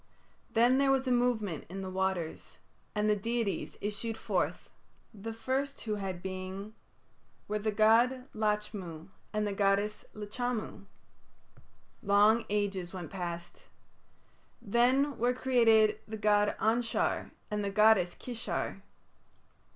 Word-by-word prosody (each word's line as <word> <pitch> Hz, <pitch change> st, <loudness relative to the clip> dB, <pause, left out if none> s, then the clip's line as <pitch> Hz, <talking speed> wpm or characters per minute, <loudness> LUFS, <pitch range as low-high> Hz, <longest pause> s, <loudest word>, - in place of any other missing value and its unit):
Then 240 Hz, +3 st, +4 dB
there 275 Hz, -1 st, +3 dB
was 265 Hz, -1 st, +2 dB
a -, -, +2 dB
movement 235 Hz, -, +1 dB
in 195 Hz, +2 st, -5 dB
the 190 Hz, -, -4 dB
waters, 190 Hz, -3 st, -2 dB, 0.4 s
and 210 Hz, 0 st, +1 dB
the 210 Hz, -, +4 dB
deities 230 Hz, 0 st, -2 dB
issued 220 Hz, +2 st, -3 dB
forth. -, -, -1 dB, 0.5 s
The 220 Hz, +2 st, -6 dB
first 265 Hz, +5 st, -2 dB
who 215 Hz, -2 st, -2 dB
had 190 Hz, -3 st, -4 dB
being 190 Hz, +2 st, -5 dB, 0.7 s
were 210 Hz, +1 st, -1 dB
the 215 Hz, +1 st, 0 dB
god 235 Hz, +5 st, +4 dB
Lachmu 210 Hz, -6 st, -2 dB, 0.2 s
and 215 Hz, 0 st, 0 dB
the 205 Hz, -, -1 dB
goddess 200 Hz, +1 st, +1 dB
Lachamu. 215 Hz, 0 st, -4 dB, 1.2 s
Long 210 Hz, +3 st, +4 dB
ages 195 Hz, -3 st, -1 dB
went 175 Hz, -3 st, -6 dB
past. 175 Hz, -2 st, -6 dB, 0.9 s
Then 250 Hz, +6 st, +2 dB
were 245 Hz, +2 st, +2 dB
created 225 Hz, -5 st, +4 dB
the 220 Hz, 0 st, -5 dB
god 205 Hz, -1 st, +3 dB
Anshar 230 Hz, +2 st, +1 dB, 0.2 s
and 210 Hz, 0 st, -1 dB
the 200 Hz, -, -1 dB
goddess 205 Hz, -3 st, +4 dB
Kishar. 240 Hz, -2 st, -4 dB
210 Hz, 120 wpm, -31 LUFS, 195-235 Hz, 1.2 s, Then